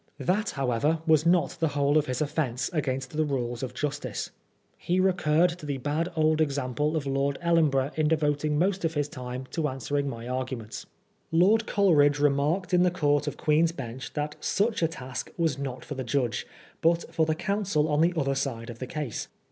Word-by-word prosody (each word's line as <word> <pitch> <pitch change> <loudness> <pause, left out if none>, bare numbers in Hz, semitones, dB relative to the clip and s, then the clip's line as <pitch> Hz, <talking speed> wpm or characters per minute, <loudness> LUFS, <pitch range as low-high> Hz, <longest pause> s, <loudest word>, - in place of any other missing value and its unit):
That, 205 +5 0
how 135 -2 0
ever, 150 +8 +1
was 160 -1 +4
not 175 -1 +3
the 165 - +2
whole 145 0 +1
of 150 -1 +3
his 130 +1 -2
offence 130 -5 -1
against 135 -3 -2
the 155 - +2
rules 120 -5 -2
of 125 -1 -5
justice. 145 -6 -3 0.4
He 180 +2 -1
recurred 180 -2 +3
to 150 - -8
the 140 -2 -2
bad 150 +6 -1
old 155 0 +3
example 145 +1 0
of 155 -3 -1
Lord 135 0 0
EUenborough 150 -5 +2
in 155 -1 +2
devoting 150 -1 +1
most 190 +3 +1
of 165 -1 -1
his 145 -1 0
time 130 -3 -6
to 160 -3 0
answering 140 +2 -2
my 115 -2 -7
arguments. 125 -3 -4 0.4
Lord 200 +7 +4
Coleridge 150 -8 +4
remarked 145 +6 +1
in 180 - +5
the 180 - +5
Court 145 -4 +1
of 145 - -3
Queen's 160 +2 +2
Bench 130 -3 -7
that 150 0 -3
such 215 +1 0
a 165 - +4
task 130 -5 -6
was 160 -5 0
not 135 -2 -5
for - - -5
the 130 -2 -4
judge, 125 -1 -1 0.3
but 170 +1 +1
for 160 -1 +2
the 155 - +1
counsel 195 -5 0
on 150 0 +2
the 170 +2 +3
other 135 -3 +1
side 125 -4 -3
of 115 - -12
the 130 - -5
case. 145 -5 -4
150 Hz, 195 wpm, -27 LUFS, 135-165 Hz, 0.4 s, in